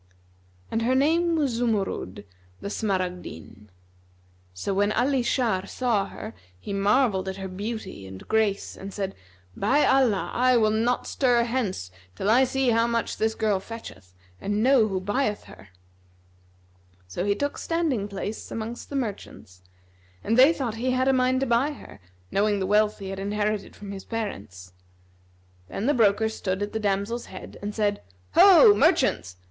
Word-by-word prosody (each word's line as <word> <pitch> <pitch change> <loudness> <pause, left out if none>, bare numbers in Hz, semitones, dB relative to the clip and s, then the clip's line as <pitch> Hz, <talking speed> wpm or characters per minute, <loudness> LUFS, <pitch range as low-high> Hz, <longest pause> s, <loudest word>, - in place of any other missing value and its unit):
And 225 - 0
her 250 +3 +2
name 330 +5 +2
was 290 -5 +1
Zumurrud—the 95 - -4
Smaragdine. 180 - -4 0.8
So 90 - -3
when 205 +2 +2
Ali 260 +3 +1
Shar 225 -6 0
saw 225 -5 0
her, 215 - -8 0.3
he 200 - -6
marvelled 200 -1 +2
at 190 - -5
her 190 -1 -5
beauty 190 - -6
and 95 0 -11
grace 220 -3 0
and 195 +1 -8
said, 195 -1 -4 0.4
"By 265 +9 +2
Allah, 250 -7 +2
I 255 0 +3
will 215 -2 +3
not 230 +3 0
stir 245 -3 +2
hence 225 - -2 0.2
till 200 - 0
I 255 +3 +5
see 265 -1 +1
how 230 +1 +3
much 235 -1 -2
this 220 0 0
girl 210 -3 +1
fetcheth, 100 - -11 0.3
and 205 +1 -1
know 255 -4 +5
who 190 -3 -2
buyeth 205 +3 -1
her!" 100 - -15 1.4
So 135 - -4
he 200 +1 +1
took 285 +5 -3
standing 315 -11 -1
place 205 +2 -6
amongst 225 +2 -6
the 285 - -6
merchants, 200 - -6 0.6
and 225 - +1
they 260 +5 +7
thought 265 -9 -3
he 250 +3 -1
had 260 +1 +2
a - - +4
mind 255 0 +2
to - - +2
buy 250 +5 +1
her, - - -13 0.3
knowing 205 0 +1
the 190 - -1
wealth 210 +2 +2
he 195 -2 -7
had 195 0 -5
inherited 205 +1 -2
from 205 -1 -9
his 195 -1 -8
parents. 100 - -6 0.9
Then 195 - -4
the 290 - +3
broker 220 -2 +3
stood 200 -3 -3
at 205 - -5
the 220 - -1
damsel's 205 +3 -1
head 185 - -10
and 205 +1 -5
said, 205 -2 0 0.3
"Ho, 400 +3 +8
merchants! 265 - +2
215 Hz, 165 wpm, -25 LUFS, 195-250 Hz, 1.4 s, Ho